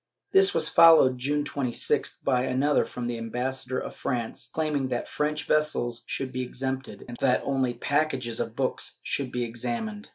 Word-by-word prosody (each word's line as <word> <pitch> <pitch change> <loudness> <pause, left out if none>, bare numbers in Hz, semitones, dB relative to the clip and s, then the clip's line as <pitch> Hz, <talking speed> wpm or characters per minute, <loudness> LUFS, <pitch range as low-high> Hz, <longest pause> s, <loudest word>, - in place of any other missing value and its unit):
This 390 0 +6
was - - +3
followed, 155 -6 +6
June 145 +3 0
26th, 135 -4 -1
by 125 0 +2
another 130 +3 +2
from 125 - -6
the 120 -1 -3
ambassa 125 +3 -3
dor 130 - -1
of - - -7
France, 120 -4 -3
claiming 150 -4 -1
that 125 -2 -3
French 150 +1 -2
vessels 150 -6 0
should 130 -1 -3
be 130 0 -3
exempted, 130 +1 -4
and 120 -1 -8
that 130 -2 +2
only 130 -3 0
packages 135 -6 -1
of - - -3
books - - -2
should 135 -3 -2
be 125 - -1
examined. 210 - -4
130 Hz, 170 wpm, -27 LUFS, 125-150 Hz, -, This